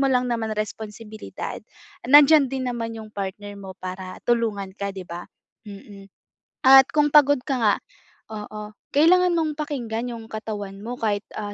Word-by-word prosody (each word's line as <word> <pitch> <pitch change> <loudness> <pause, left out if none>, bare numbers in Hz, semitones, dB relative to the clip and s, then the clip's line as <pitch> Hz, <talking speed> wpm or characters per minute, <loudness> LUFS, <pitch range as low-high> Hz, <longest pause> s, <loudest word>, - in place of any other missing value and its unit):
mo 275 - +3
lang 250 -1 +1
naman 225 -2 -2
responsibilidad, 215 0 -6 0.5
nandiyan 290 0 +7
din 260 -2 -2
naman 230 -1 -4
'yong 220 -1 -9
partner 200 +1 -5
mo 190 -1 -9
para 185 0 -7
tulungan 215 -5 0
ka, 200 -1 -3
'di 185 - -6
ba. 175 +1 -7 0.4
Mm, 200 0 -12 0.6
at 265 0 +9
kung 295 -1 +3
pagod 285 -1 +6
ka 275 - -1
nga 215 -3 +3 0.6
oo, 210 0 -7 0.2
kailangan 355 +4 +5
mong 315 -2 0
pakinggan 245 -6 -3
'yong 225 -1 -9
katawan 205 -3 -6
mo 240 +3 -5
kahit, 205 -2 0 0.2
ah, 205 -1 -5
220 Hz, 155 wpm, -23 LUFS, 205-265 Hz, 0.6 s, at